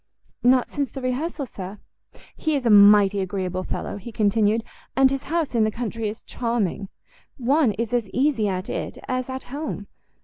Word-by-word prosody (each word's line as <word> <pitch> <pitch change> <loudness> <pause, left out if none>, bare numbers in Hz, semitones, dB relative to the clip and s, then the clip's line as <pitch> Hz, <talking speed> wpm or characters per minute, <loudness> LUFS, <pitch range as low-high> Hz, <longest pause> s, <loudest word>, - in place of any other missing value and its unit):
"Not 250 0 +4
since 280 -3 -3
the 270 - -6
rehearsal, 270 +4 -2
sir." 195 -3 -8 0.6
"He 315 -2 0
is 270 -3 -2
a 230 - +4
mighty 205 -1 +7
agreeable 185 -1 -2
fellow," - - -4
he 220 +4 -8
continued, 215 +1 +2 0.3
"and 265 0 +5
his 275 -1 -3
house 325 -3 -1
in 230 -2 +3
the 215 - +2
country 225 -1 -3
is 215 - -8
charming. 220 -5 -2 0.5
One 265 -1 +3
is 230 +2 -3
as 235 -5 0
easy 255 -2 +1
at 185 -1 -2
it - - -4
as 255 0 -2
at 260 0 -5
home. 285 -8 -4
230 Hz, 175 wpm, -24 LUFS, 205-260 Hz, 0.6 s, mighty